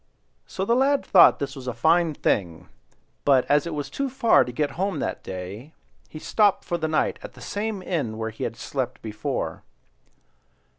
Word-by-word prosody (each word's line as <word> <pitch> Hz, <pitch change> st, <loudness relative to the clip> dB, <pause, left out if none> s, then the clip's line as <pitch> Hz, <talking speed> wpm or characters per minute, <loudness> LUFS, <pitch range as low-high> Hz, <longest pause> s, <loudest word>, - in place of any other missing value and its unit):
'" -, -, -45 dB
So 190 Hz, -, -3 dB
the 230 Hz, -, +2 dB
lad 275 Hz, +2 st, +2 dB
thought 185 Hz, -, +7 dB
this 140 Hz, 0 st, -4 dB
a 130 Hz, -2 st, -5 dB
fine 160 Hz, +4 st, +3 dB
thing; 85 Hz, -11 st, -1 dB, 0.5 s
but 135 Hz, -3 st, +4 dB
as 145 Hz, +2 st, +2 dB
it 170 Hz, -, -4 dB
was 145 Hz, -1 st, -3 dB
too 275 Hz, -1 st, -3 dB
far 250 Hz, -3 st, +4 dB
to 125 Hz, -, -6 dB
get 145 Hz, +3 st, -1 dB
home 190 Hz, -1 st, -2 dB
that -, -, -3 dB
day, 95 Hz, -, -8 dB, 0.4 s
he -, -, -9 dB
stopped 205 Hz, +5 st, +2 dB
for 175 Hz, -1 st, -2 dB
the 160 Hz, -, -1 dB
night 155 Hz, 0 st, 0 dB
at -, -, -9 dB
the -, -, -15 dB
same 205 Hz, -2 st, -4 dB
inn 140 Hz, -13 st, -2 dB
where 110 Hz, 0 st, -3 dB
he 110 Hz, -, -7 dB
had 115 Hz, -, -3 dB
slept 125 Hz, +2 st, -4 dB
before. 110 Hz, -1 st, -4 dB
150 Hz, 190 wpm, -24 LUFS, 120-190 Hz, 0.5 s, thought